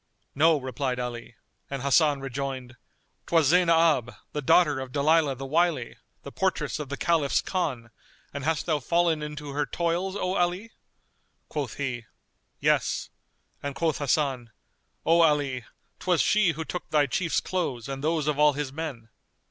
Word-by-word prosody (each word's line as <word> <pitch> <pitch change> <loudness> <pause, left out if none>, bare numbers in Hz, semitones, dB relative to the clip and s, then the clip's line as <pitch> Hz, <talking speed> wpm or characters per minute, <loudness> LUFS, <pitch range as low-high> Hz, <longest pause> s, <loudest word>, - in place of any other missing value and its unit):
"No," 155 +2 +4
replied 130 -1 -3
Ali; 120 -1 -5 0.3
and 140 -2 -4
Hasan 140 0 +3
rejoined, 135 -2 -5 0.5
"'Twas 165 -5 +3
Zaynab, 165 -7 +4 0.2
the 150 - -2
daughter 145 0 +4
of 130 -1 -6
Dalilah 150 0 +3
the 135 - -6
Wily, 155 -3 +1 0.3
the - - -8
portress - - -1
of 150 -3 -5
the 140 - -4
Caliph's 160 -5 +2
Khan; 130 - -3 0.4
and 140 -1 -5
hast 160 0 0
thou 155 -3 +1
fallen 165 +3 +1
into 150 -1 -6
her 145 +1 -1
toils, 175 +3 -1
O 185 -2 -1
Ali?" 180 +6 -1 0.8
Quoth 145 -5 -4
he, 130 -5 -3 0.5
"Yes," - - +1 0.5
and 140 -1 -4
quoth 160 -2 0
Hasan, 135 -4 0 0.6
"O 165 +1 +5
Ali, 145 -6 +2 0.3
'twas 180 -3 +1
she 200 -5 +3
who 160 +1 -5
took 180 - -6
thy 150 -2 +3
Chief's 160 +2 0
clothes 140 -11 -3
and 135 0 -5
those 160 -1 +1
of 150 -1 0
all 150 -1 +5
his 140 -1 -4
men." 140 -8 -6
150 Hz, 155 wpm, -26 LUFS, 135-165 Hz, 0.8 s, O